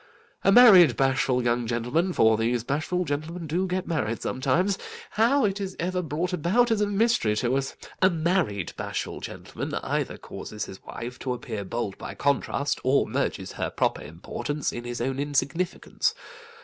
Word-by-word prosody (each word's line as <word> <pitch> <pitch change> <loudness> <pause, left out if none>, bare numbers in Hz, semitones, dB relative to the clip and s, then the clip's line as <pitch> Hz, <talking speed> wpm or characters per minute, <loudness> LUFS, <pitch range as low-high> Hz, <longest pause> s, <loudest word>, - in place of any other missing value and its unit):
A 195 - +5
married 190 - +8
bashful 130 -1 +2
gentleman—for 120 +3 +2
these 115 +1 0
bashful 155 +7 -1
gentlemen 160 +4 -4
do 175 +5 0
get 185 0 -2
married 115 -9 -1
sometimes; 170 +10 0 0.3
how 240 +5 +3
it 200 0 -1
is 190 -1 -4
ever 180 +1 -1
brought 165 +3 -2
about, 200 +9 +2
is 220 -2 +2
a 210 - +2
mystery 205 - +2
to 120 +4 +1
us—a 135 +7 0
married 165 - 0
bashful - - -4
gentleman - - -6
either - - -2
causes 105 0 -7
his 95 - -11
wife 125 +2 -7
to 130 - -2
appear 110 -4 -5
bold 105 0 -4
by - - -7
contrast, 140 0 0
or 135 +2 +3
merges - - -2
her - - -3
proper - - 0
importance 135 - -4
in 120 - -6
his 120 -1 -4
own 135 +2 -1
insignificance. 145 +5 -1
145 Hz, 155 wpm, -26 LUFS, 120-185 Hz, 0.3 s, married